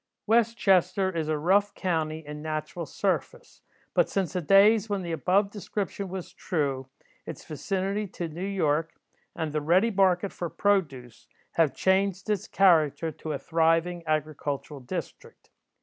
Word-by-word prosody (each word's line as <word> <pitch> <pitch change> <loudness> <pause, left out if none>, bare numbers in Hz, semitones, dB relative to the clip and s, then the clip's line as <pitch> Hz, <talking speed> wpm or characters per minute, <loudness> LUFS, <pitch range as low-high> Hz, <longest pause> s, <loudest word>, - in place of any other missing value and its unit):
'" - - -60
West 230 +1 +3
Chester 190 -1 +2
is 160 -2 -1
a 155 -1 0
rough 200 +6 +2
county 160 -4 -2
in 150 0 -7
natural 155 +1 -4
surface, - - -3 0.3
but - - +3
since 190 -3 -1
the 180 - -1
days 200 +5 +5
when 200 -2 -1
the 170 - -4
above 185 +6 +1
description 200 -1 -4
was 185 -1 -7
true, 140 -9 -2 0.4
its - - -8
vicinity 195 +5 -2
to 175 -2 -5
New 165 +3 -7
York, 165 -5 0 0.4
and 160 -3 -3
the 150 - 0
ready 185 +9 +3
market 190 -1 +2
for 175 - -4
produce, 145 - -1 0.2
have 160 -5 +2
changed 190 0 +1
its 205 -3 -1
character 165 -4 +3
to 155 +1 -7
a - - -2
thriving 165 +1 +1
agricultural 150 -2 -2
district. 125 - -8
175 Hz, 150 wpm, -27 LUFS, 155-195 Hz, 0.4 s, days